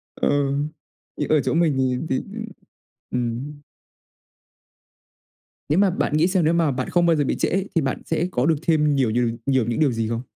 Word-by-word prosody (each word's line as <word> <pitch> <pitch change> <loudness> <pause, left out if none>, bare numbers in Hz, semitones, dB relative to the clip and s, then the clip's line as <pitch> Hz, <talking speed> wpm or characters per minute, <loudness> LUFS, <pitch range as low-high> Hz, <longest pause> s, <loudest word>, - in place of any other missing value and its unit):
Ừ, 140 -1 +1 0.6
thì - - -2
ở 155 -1 +4
chỗ - - -1
mình 165 -3 +3
thì 130 -1 +1
thì, 130 - +1 0.9
ư - - -1
ừm. 125 +5 -4 2.1
Nếu 150 - +2
mà 200 -1 +4
bạn 180 - -1
nghĩ 160 +3 +4
xem, 185 -3 +1
nếu 160 - +3
mà 165 -3 +2
bạn 130 -1 -3
không 175 -1 +3
bao 165 -1 +4
giờ 145 - +1
bị - - -1
trễ - - +1
ấy 195 +2 -1
thì 165 - +3
bạn 135 -2 -2
sẽ 165 +2 0
có 125 -5 0
được 160 0 +3
thêm 150 -3 +2
nhiều 130 -5 +2
nhiều 120 +1 +1 0.2
nhiều 130 -3 +2
những 120 +6 -2
điều 145 -4 +3
gì 115 -1 -2
không? 115 0 -2
145 Hz, 210 wpm, -22 LUFS, 125-165 Hz, 2.1 s, ở